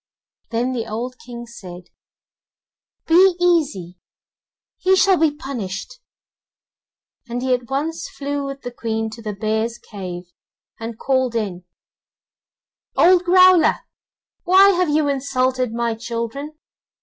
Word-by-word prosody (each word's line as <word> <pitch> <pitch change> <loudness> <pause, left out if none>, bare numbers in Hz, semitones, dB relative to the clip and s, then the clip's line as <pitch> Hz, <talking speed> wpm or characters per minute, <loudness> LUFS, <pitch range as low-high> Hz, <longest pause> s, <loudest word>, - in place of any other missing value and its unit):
Then 235 +2 -1
the 230 -3 -3
old 245 +4 -5
King 240 -1 -8
said: 185 -7 -11 1.1
'Be 360 +2 +5
easy, 280 - 0 0.8
he 380 +1 +3
shall 380 0 +4
be 320 -1 +4
punished,' 265 - -6 1.3
and 245 +1 -3
he 260 -1 +2
at 245 -2 -2
once 300 +5 -3
flew 285 0 -4
with 275 0 -7
the 245 - -5
Queen 225 -2 -3
to 230 - -10
the 215 -2 -4
bear's 220 +3 -1
cave, 185 -6 -8 0.6
and 225 0 -6
called 260 -2 0
in: 190 -6 -3 1.3
'Old 360 0 +5
Growler, 365 -1 +5 0.6
why 380 +2 +6
have 360 -3 +1
you 300 0 +2
insulted 255 -3 0
my 235 0 -1
children? 235 +6 -5
250 Hz, 120 wpm, -20 LUFS, 225-305 Hz, 1.3 s, why